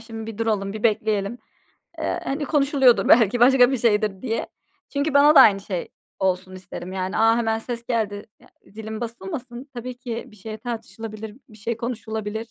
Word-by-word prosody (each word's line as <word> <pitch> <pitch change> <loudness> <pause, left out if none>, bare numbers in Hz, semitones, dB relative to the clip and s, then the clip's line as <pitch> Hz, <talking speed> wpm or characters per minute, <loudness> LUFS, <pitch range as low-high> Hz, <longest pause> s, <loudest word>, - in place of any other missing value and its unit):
şimdi 225 -1 -8
bir 210 - -14
duralım 210 -3 -1
bir 215 0 -7
bekleyelim. 215 0 0 0.6
Eee, - - -1
hani 285 +2 -2
konuşuluyordur 275 -4 +3
belki 230 0 +5
başka 250 0 +6
bir 265 - 0
şeydir 210 -4 +1
diye. 230 -3 -2 0.5
Çünkü 285 +1 0
bana 295 +2 +6
da - - +10
aynı 200 -6 +7
şey 185 -3 -4 0.3
olsun 185 0 -1
isterim 185 0 -8
yani. 190 +1 -3
A, 225 +1 +4
hemen 225 -1 0
ses 235 0 -6
geldi, 210 -4 -1
ya - - -20 0.2
zilim 220 +2 -8
basılmasın. 250 +1 -6
Tabii 245 +1 -6
ki 240 -2 -5
bir 215 - -17
şey 215 +2 -8
tartışılabilir, 220 -2 -7
bir 215 - -15
şey 225 +2 -3
konuşulabilir. 220 -3 -4
225 Hz, 175 wpm, -23 LUFS, 210-245 Hz, 0.6 s, da